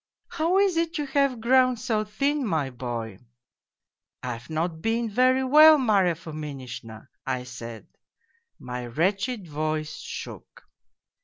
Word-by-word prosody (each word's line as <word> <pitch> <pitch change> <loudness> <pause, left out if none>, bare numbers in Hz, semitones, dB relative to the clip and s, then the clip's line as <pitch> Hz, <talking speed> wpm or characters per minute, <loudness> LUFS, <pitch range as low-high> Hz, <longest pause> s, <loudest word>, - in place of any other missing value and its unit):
" - - -67
' - - -54
How 335 +4 +2
is 390 -4 +3
it 335 +1 0
you 295 - -2
have 275 -3 +1
grown 255 +1 +4
so 225 -2 -1
thin, 275 +8 -1
my 160 - -1
boy? 120 -5 -5 0.3
' - - -67
" - - -64
' - - -55
I've, 120 -1 -6
not 160 +1 -2
been 225 +1 0
very 255 +4 +3
well, 305 +4 +8
Marya 200 - +2
Fominishna,' 140 -8 -8 0.2
I 130 -1 -1
said. 115 -2 -9 0.7
My 125 -1 -6
wretched 195 - -1
voice 155 0 -3
shook. - - -9
185 Hz, 150 wpm, -26 LUFS, -, 0.7 s, well